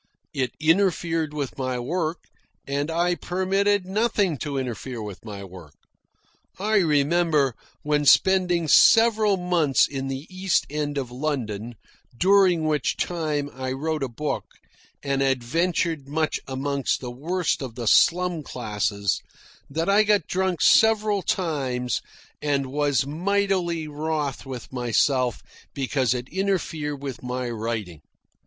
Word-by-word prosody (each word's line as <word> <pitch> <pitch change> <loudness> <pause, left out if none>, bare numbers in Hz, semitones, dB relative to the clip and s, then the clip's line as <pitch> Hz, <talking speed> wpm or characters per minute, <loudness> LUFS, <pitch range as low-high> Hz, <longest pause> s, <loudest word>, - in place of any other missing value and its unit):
It 130 -2 -1
interfered 165 -1 +1
with 145 -3 -5
my 130 -1 -1
work, 160 +6 -2 0.4
and 140 +2 -2
I 170 +2 +1
permitted 190 +2 0
nothing 205 -3 +1
to 145 -2 -3
interfere 125 -1 -4
with 105 -3 -7
my 100 -3 -7
work. 90 -5 -12 0.8
I 215 +3 +1
remember, 150 - +2 0.3
when 150 0 +1
spending 180 0 +4
several 220 +2 +5
months 175 -6 +2
in 135 -1 -4
the 135 +2 -5
East 185 -2 0
End 145 -1 -2
of 130 -3 -3
London, 120 -5 -3 0.4
during 185 -2 +4
which 150 -4 0
time 155 -4 -1
I 130 0 -4
wrote 155 +3 -2
a 135 - 0
book 145 +5 -3 0.6
and 140 -1 0
adventured 145 +4 0
much 155 +2 -1
amongst 135 +1 -1
the 125 -2 -6
worst 165 +8 -1
of 125 -4 -6
the 120 -1 -5
slum 175 +7 +3
classes, 105 - -2 0.5
that 160 +4 -2
I 200 +2 +5
got 210 -5 +2
drunk 185 -3 -1
several 215 -2 +4
times 135 - -1 0.4
and 140 -2 0
was 145 -2 +1
mightily 175 0 0
wroth 150 -2 -3
with 130 -1 -8
myself 125 0 +1 0.3
because 130 -2 0
it 125 0 -5
interfered 160 -7 -2
with 135 -3 -5
my 125 -1 -3
writing. 110 -8 -4
150 Hz, 130 wpm, -24 LUFS, 130-180 Hz, 0.8 s, several